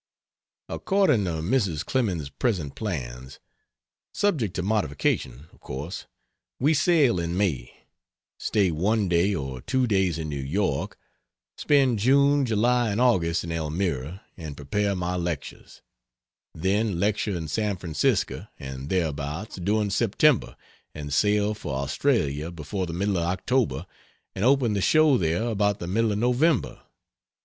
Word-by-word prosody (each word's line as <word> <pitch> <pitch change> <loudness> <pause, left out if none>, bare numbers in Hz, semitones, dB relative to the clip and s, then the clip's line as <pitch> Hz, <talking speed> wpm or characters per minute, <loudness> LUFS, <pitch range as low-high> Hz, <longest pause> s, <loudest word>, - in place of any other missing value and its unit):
According 190 - +2
to 80 -3 -2
Mrs. 95 - 0
Clemens's 90 - -1
present 90 - -1
plans 65 - -5 0.7
subject 150 - 0
to 90 - -2
modification, 75 - -1
of - - -21
course 75 +9 -6 0.5
we 145 +5 +3
sail 145 - +3
in 85 +1 -2
May; 75 -12 -1 0.7
stay 100 -4 +1
one 100 +6 +1
day, 90 +3 +2
or 65 -5 -5
two 130 - +1
days 95 -7 +1
in 80 -1 -4
New 70 -2 -4
York, 70 +1 -1 0.6
spend 135 -6 +2
June, 140 +4 +4
July 120 +2 +2
and 100 +2 -1
August 85 -10 +2
in 85 - -5
Elmira 80 +1 -2
and 80 -5 -8
prepare 100 +8 -1
my 90 0 -2
lectures; 85 -5 -5 0.7
then 95 +2 0
lecture 105 -1 0
in 80 -2 -5
San 105 +3 -1
Francisco 80 -5 -1
and 65 +1 -7
thereabouts 80 +2 -2
during 105 +3 0
September 120 +6 +2 0.4
and 75 -2 -5
sail 105 +5 +2
for 75 -10 -5
Australia 70 +2 0
before 90 +3 -4
the - - -5
middle 100 +2 0
of 85 - 0
October 115 +7 0 0.5
and 95 - -3
open 130 -3 +3
the 100 - 0
show 155 +4 +5
there 85 +4 0
about 105 -3 +1
the - - -6
middle 110 +5 +1
of 100 - -1
November. 125 +6 +1
95 Hz, 140 wpm, -25 LUFS, 80-115 Hz, 0.7 s, show